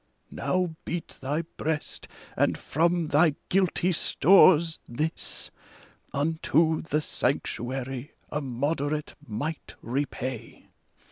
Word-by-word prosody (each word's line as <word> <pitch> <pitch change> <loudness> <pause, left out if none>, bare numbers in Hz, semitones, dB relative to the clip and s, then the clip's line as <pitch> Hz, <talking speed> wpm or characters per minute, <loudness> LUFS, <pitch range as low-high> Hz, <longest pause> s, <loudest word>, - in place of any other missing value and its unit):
Now 180 -3 -1
beat 170 -1 -5
thy 145 +5 -1
breast, 155 -1 -3 0.3
and - - +2
from 170 +1 +1
thy 150 0 +4
guilty 185 -1 +2
stores, 170 -1 +5
this 150 +7 -2 0.6
Unto 160 +2 +2
the 155 -1 0
Sanctuary 130 0 -2 0.2
a 150 - -1
moderate 145 +3 -2
mite 140 +8 -4
repay 130 -2 -4
150 Hz, 90 wpm, -27 LUFS, 135-165 Hz, 0.6 s, stores